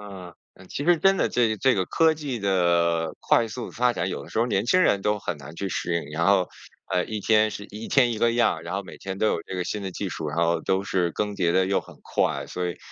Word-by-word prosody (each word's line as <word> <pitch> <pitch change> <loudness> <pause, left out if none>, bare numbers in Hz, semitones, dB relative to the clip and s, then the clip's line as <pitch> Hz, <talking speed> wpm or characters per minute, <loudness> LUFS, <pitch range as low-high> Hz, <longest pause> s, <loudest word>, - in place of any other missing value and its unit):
啊， 95 -4 -10 0.2
呃， 95 - -16
其 145 - -4
实 175 +2 +5
真 195 +3 +4
的 - - +1
这 115 -3 +1
这 130 +4 +3
个 95 - 0
科 160 -1 +3
技 145 -5 -4
地 85 -4 +1
快 115 - +3
速 120 +2 -6
发 125 +1 +1
展， - - -2
有 - - -4
的 - - -14
时 - - -3
候 115 - +3
年 105 -2 0
轻 185 +8 +4
人 100 - +2
都 105 +1 +1
很 90 - -4
难 75 +2 -11
去 100 - -3
适应， 85 -3 -2
然 85 +2 0
后， 95 -2 +3 0.4
呃， 90 0 +2
一 110 -1 -5
天 110 +1 +3
是 105 - -7
一 110 +2 -7
天 125 -4 +4
一 110 - -4
个 115 +1 +3
样， 115 -9 +1
然 85 +3 -5
后 100 - -2
每 95 - -11
天 95 0 -6
都 110 - +2
有 85 - 0
这 95 - -8
个 90 -1 -2
新 105 +2 -4
的 95 - -4
技 95 +2 -4
术， 80 -3 -4
然 75 +3 -4
后 85 0 +2
都 95 0 0
是 90 -4 0
更 105 -1 -2
迭 85 -2 +1
得 95 +1 +3
又 95 0 +1
很 - - -15
快， - - -1
所 90 0 -3
以， 85 - -5
100 Hz, 295 characters per minute, -25 LUFS, 90-115 Hz, 0.4 s, 实